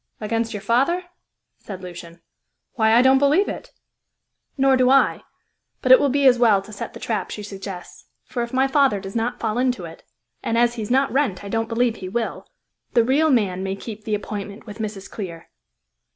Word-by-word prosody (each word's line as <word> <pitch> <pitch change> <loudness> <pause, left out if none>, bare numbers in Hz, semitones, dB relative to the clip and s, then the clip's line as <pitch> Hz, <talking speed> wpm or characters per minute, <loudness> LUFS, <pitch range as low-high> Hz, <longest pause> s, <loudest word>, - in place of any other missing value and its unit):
"Against 225 +1 -2
your 205 -3 -6
father?" 270 - +2 0.6
said 190 -3 -9
Lucian. 170 -1 -10 0.5
"Why, 220 -2 +3
I 240 - +6
don't 265 0 +5
believe 295 +9 +3
it!" - - -6 0.9
"Nor 270 0 +4
do 255 -1 +3
I; 275 +1 +4 0.6
but - - +3
it - - +10
will 285 - +2
be 280 +1 +1
as 250 -2 +6
well 220 -5 +5
to 215 - -12
set 200 - -6
the - - -8
trap 220 -2 -2
she 210 - -6
suggests; 195 -2 -9 0.2
for 245 - -4
if 235 0 -4
my 260 +1 +2
father 270 -6 +3
does 195 +1 -9
not 235 +2 -1
fall 225 +1 -1
into 250 -8 0
it 165 - -11 0.4
and 230 - -1
as 240 0 +3
he 235 - -6
is 210 - -5
not 270 +1 +2
Wrent, 255 -10 0
I 200 - -7
don't 225 +1 -1
believe 235 0 +1
he 185 - -7
will 230 +3 -3 0.5
the 235 - +6
real 285 +6 +3
man 200 -9 +1
may 190 0 -2
keep 215 +1 -9
the 215 -2 -1
appointment 205 0 -6
with 210 0 -10
Mrs. 205 -3 -5
Clear." 170 -6 -8
225 Hz, 205 wpm, -22 LUFS, 200-255 Hz, 0.9 s, it